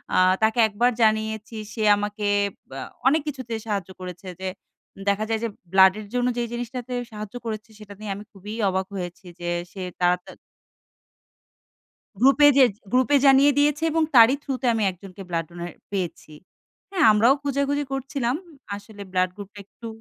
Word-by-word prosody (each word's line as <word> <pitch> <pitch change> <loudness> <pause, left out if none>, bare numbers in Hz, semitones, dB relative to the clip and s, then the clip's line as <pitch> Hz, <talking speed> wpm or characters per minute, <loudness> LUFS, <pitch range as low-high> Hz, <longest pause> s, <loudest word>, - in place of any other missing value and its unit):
আ - - +3 0.3
তাকে 220 +2 +2
একবার 235 +4 +1
জানিয়েছি 220 0 +1 0.2
সে 220 - -3
আমাকে 205 +1 -3 0.4
বা 135 - -7 0.3
অনেক 305 +3 +4
কিছুতে 260 -5 -5
সাহায্য 200 -4 -2
করেছে 180 +1 -8
যে 190 - -4 0.6
দেখা 200 +2 +1
যায় 225 -1 0
যে 230 - 0 0.2
ব্লাডের 190 +2 +5
জন্য 245 0 +1
যে 240 - 0
জিনিসটাতে 245 +1 -5 0.2
সাহায্য 210 +1 -8
করেছে 220 0 -5
সেটা 210 -1 -11
নিয়ে 210 -2 -5
আমি 205 - -8
খুবই 205 +1 -9 0.2
অবাক 190 0 -1
হয়েছি 180 0 -6
যে 175 0 -3 0.2
সে 195 - -8 0.2
তা 180 - +3 0.2
তার - - -12 1.8
গ্রুপে 275 +6 +6
যেয়ে, 260 -3 +7 0.2
গ্রুপে 255 +3 +3
জানিয়ে 275 +1 +7
দিয়েছে 295 +2 +2
এবং 325 0 +2
তারই 235 +3 +8
থ্রু 275 - -3
তে - - -3
আমি 220 -2 0
একজনকে 185 +2 -12
ব্লাড 165 -2 -1
ডোনার 175 0 -7 0.2
পেয়েছি। 175 -5 -4 0.6
হ্যাঁ, 370 -10 +3
আমরাও 225 +5 +5
খুঁজেখুঁজি 280 +1 0
করছিলাম। 270 -2 -1 0.4
আসলে 205 0 -11
ব্লাড 185 0 +2
গ্রুপটা 205 0 -10
একটু। 230 +3 -11
220 Hz, 160 wpm, -24 LUFS, 195-255 Hz, 1.8 s, তারই